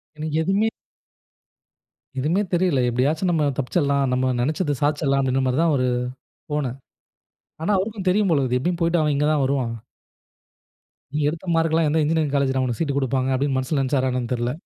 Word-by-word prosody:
எனக்கு 155 0 -4
எதுவுமே 195 +6 +1 1.5
எதுவுமே 160 +9 +1
தெரியல. 175 -5 +2
எப்படியாச்சும் 145 +9 0
நம்ம 155 -3 +2
தப்பிச்சரலாம். 140 0 +1
நம்ம 130 0 +1
நெனச்சத 145 +4 0
சாதிச்சிடலாம் 145 -2 +1
அப்டின்ற 130 0 +1
மாரி 130 +1 0
தான், 165 -3 +3
ஒரு 130 -1 +1 0.6
போனே. 145 -4 -1 0.9
ஆனா 185 - 0
அவருக்கும் 195 0 -3
தெரியும் 200 +1 +2
போல 145 - +3
இருக்கு. 125 -1 0
எப்படியும் 175 +5 -2
போயிட்டு 165 0 +2
அவன் 150 -1 +1
இங்க 145 +1 +1
தான் 145 -3 +2
வருவான். 130 -3 0 1.4
நீ - - +1
எடுத்த 165 +4 -6
மார்க்குல்லாம் 165 -1 +2
எந்த 160 +2 +1
இன்ஜினியரிங் 155 -1 0
காலேஜ்ல 135 -1 +1
உனுக்கு 120 -3 -2
சீட் 140 -4 -1
கொடுப்பாங்க 130 -1 0
அப்படின்னு 135 0 0
மனசுல 130 +3 -1
நெனச்சாரா 130 -1 +1
என்னன்னு 125 -1 -3
தெரியல? 120 0 -1
145 Hz, 165 wpm, -23 LUFS, 130-165 Hz, 1.5 s, தான்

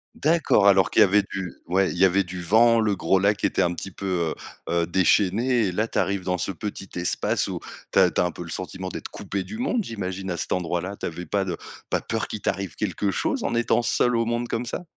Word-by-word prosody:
D'accord, 150 -10 +3
alors 95 -1 +5
qu'il - - +2
y - - +10
avait 100 +2 +4
du 95 -3 -4
ouais, 95 +2 +2
il - - -5
y 95 - +3
avait 95 +1 +4
du 90 0 -6
vent, 115 +6 +5
le 105 -3 +1
gros 95 - +2
lac 100 +1 +2
était - - +1
un 90 -1 +2
petit 95 +2 -7
peu, 90 -4 -1 0.3
heu, 85 - -1
heu, - - 0
déchaîné 100 +6 +2
et - - -1
là 110 +5 0
tu - - -1
arrives 100 -1 0
dans 90 0 0
ce 95 - -2
petit 100 +1 -6
espace 85 0 0
où - - -4 0.3
tu - - +5
as 90 -3 +5
tu - - -1
as - - +3
un 90 - -1
peu 85 - -8
le 85 - -10
sentiment 95 +1 -5
d'être - - -6
coupé 100 -1 -4
du 220 - -8
monde, 245 -3 0
j'imagine, 95 -3 -4
à 90 - -1
cet 80 - -5
endroit-là? 90 +2 -2
Tu - - -5
avais 90 +1 -5
pas 100 0 0
de 90 -3 -2 0.3
pas - - 0
peur 115 -1 -2
qu'il 105 - -6
t'arrive 95 -6 -2
quelque 100 - -1
chose 95 - -1
en 120 - -1
étant 120 0 +2
seul 120 0 +2
au 115 - +1
monde 120 +1 -2
comme 115 +2 -2
ça? 125 - -4
95 Hz, 255 wpm, -24 LUFS, 90-110 Hz, 0.3 s, y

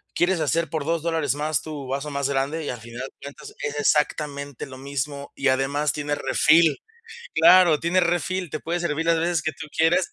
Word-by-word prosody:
¿Quieres 175 0 +2
hacer 165 +1 0
por 155 -3 -3
2 165 0 0
dólares 160 -5 0
más 150 0 -1
tu 150 -4 -7
vaso 140 +3 -3
más 140 0 -1
grande? 140 +4 -1
Y - - -3
al 125 - -4
final 120 +2 -8
de - - -20
cuentas 140 0 -10
es 145 0 -3
exactamente 145 -2 0
lo 130 -1 -11
mismo 140 +1 -4
y 140 - -1
además 135 +3 +1
tiene 145 -1 -3
refill. 155 +1 +4 0.6
Claro, 180 -4 +6
tiene 170 +3 +2
refill, 175 0 -1
te 155 - -3
puede 175 +1 -2
servir 165 -1 -2
las 165 -1 +3
veces 170 -1 0
que 155 - -2
tú 160 - -9
quieras, 170 +3 +3
150 Hz, 200 wpm, -24 LUFS, 140-165 Hz, 0.6 s, Claro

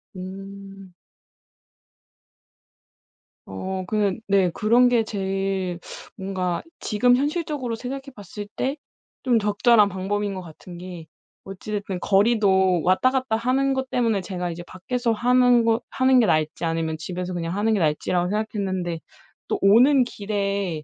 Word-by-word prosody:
음. 195 0 -9 2.5
어 185 - -5
그냥 210 -2 0
네 195 -3 +3
그런 235 +7 +4
게 240 -2 +3
제일 195 -3 -2 0.4
뭔가 185 -3 -3 0.2
지금 245 +3 +3
현실적으로 290 -4 -2
생각해 265 +4 -6
봤을 205 0 -8
때 270 +3 -2 0.5
좀 245 -3 +3
적절한 210 +1 +4
방법인 200 +2 -2
것 190 - -5
같은 175 +1 -12
게 175 -2 -9 0.4
어찌 195 +2 -8
됐든 200 -3 -3
거리도 195 -4 +3
왔다 185 +8 +3
갔다 255 -4 0
하는 265 +3 +1
것 265 0 -3
때문에 230 -4 +1
제가 180 -2 -4
이제 170 +1 -7
밖에서 235 +6 -2
하는 245 +1 +4
거 225 0 +2
하는 260 0 +4
게 235 - +4
나을지 155 -2 0
아니면 165 -1 -1
집에서 180 +2 -5
그냥 170 0 -3
하는 215 +2 +1
게 210 - +1
나을지라고 175 +2 0
생각했는데 190 -5 -2 0.5
또 - - -1
오는 250 +7 +6
길에 200 -7 -3
200 Hz, 275 characters per minute, -23 LUFS, 185-235 Hz, 2.5 s, 오는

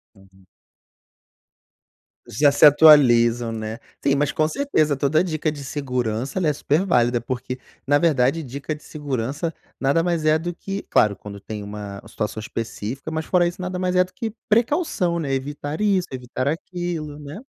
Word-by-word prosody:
Uhum. 95 -1 -22 1.8
Já 145 +6 +3
se 145 - +5
atualizam, 120 -6 +6
né. 110 0 -5 0.3
Sim, 140 - +3
mas 145 +1 +1
com 155 0 +1
certeza 160 - +1
toda 145 +5 +2
dica 155 -3 -1
de 145 -2 -8
segurança 125 0 -2
ela 170 - +1
é 150 - +2
super 150 +5 +1
válida, 120 - +2
porque, 125 +1 -4 0.3
na 145 +1 +3
verdade 155 -1 +2
dica 140 +3 -5
de 150 - -11
segurança 145 +2 -3 0.3
nada 140 +5 +2
mais 170 -3 0
é 155 0 +5
do 175 +1 -4
que 195 +3 -5
claro, 105 -2 +3
quando 100 -1 -10
tem 105 +1 -7
uma 100 -1 -7
situação 110 0 -4
específica. 115 +5 -5
Mas, 160 0 -3
fora 175 -2 +3
isso, 175 +1 -6
nada 180 0 -3
mais 180 0 -1
é 180 - +6
do 185 0 -14
que 220 +1 -4 0.2
precaução, 225 - +1
né? 140 -4 -2
Evitar 145 +3 -4
isso, 195 -4 +2
evitar 130 +1 -4
aquilo, 165 -2 -4
né? 150 +9 -8
145 Hz, 170 wpm, -22 LUFS, 125-170 Hz, 1.8 s, atualizam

